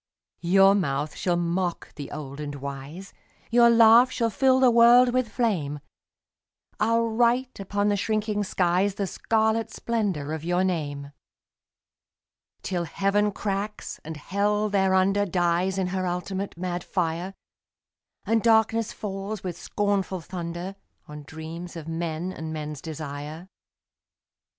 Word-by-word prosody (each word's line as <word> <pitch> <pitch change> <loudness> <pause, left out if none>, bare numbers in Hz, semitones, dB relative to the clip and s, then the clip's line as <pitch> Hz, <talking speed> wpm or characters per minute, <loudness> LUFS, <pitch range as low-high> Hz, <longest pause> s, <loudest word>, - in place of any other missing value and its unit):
Your 195 +3 +5
mouth 150 -6 -1
shall 175 -2 0
mock 175 +1 -2
the 145 - -8
old 140 -1 -7
and 145 -1 -5
wise, 140 +7 -8 0.4
Your 235 0 +6
laugh 230 +2 +7
shall 230 -3 0
fill 260 +2 +3
the 255 -2 +5
world 240 +1 +6
with 255 -2 +1
flame, 175 - -1 1.0
I'll 230 +2 +2
write 240 +2 +1
upon 205 +1 0
the 205 - +2
shrinking 210 0 -1
skies 185 +1 +1
The 200 - -1
scarlet 220 +3 0
splendour 195 -11 -2
of 160 -1 -5
your 175 +2 +1
name, 145 -6 -3 1.5
Till 175 -2 -2
Heaven 200 +5 +1
cracks, 205 +1 -4
and 160 0 -7
Hell 205 +6 0
thereunder 195 +1 +2
Dies 180 +1 +1
in 185 -1 0
her 185 -1 -1
ultimate 185 +2 -4
mad 175 0 -3
fire, 180 +1 -2 0.9
And 225 0 +2
darkness 225 0 +3
falls, 195 0 -5
with 180 -3 -4
scornful 195 +1 -1
thunder, 175 +2 -6 0.3
On 150 0 -9
dreams 160 +4 -8
of 165 -2 -8
men 165 +2 -3
and 160 -2 -6
men's 150 -2 -5
desire. 155 +2 -7
190 Hz, 130 wpm, -25 LUFS, 165-210 Hz, 1.5 s, laugh